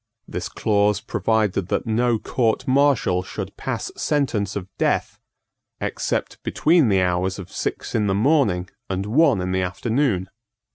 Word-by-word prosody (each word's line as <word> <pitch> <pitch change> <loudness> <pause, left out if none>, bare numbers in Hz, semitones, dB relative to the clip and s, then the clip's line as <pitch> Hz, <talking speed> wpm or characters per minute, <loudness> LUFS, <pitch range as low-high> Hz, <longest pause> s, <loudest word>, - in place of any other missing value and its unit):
This - - -4
clause 105 -1 +1
provided 105 -5 0
that - - -1
no 115 +1 +2
court 115 0 0
martial 130 -9 +3
should 95 - -6
pass - - -4
sentence 115 -10 0
of 95 -2 -4
death - - 0 0.6
except - - -2
between 160 -5 +3
the 95 -2 +3
hours 90 +1 0
of 95 -1 -9
six - - -4
in 105 -2 +1
the 95 - +1
morning 105 - +2 0.2
and 95 0 -2
one 130 - +3
in 90 0 -2
the 95 0 +1
afternoon. 100 +2 0
105 Hz, 145 wpm, -22 LUFS, 95-125 Hz, 0.6 s, martial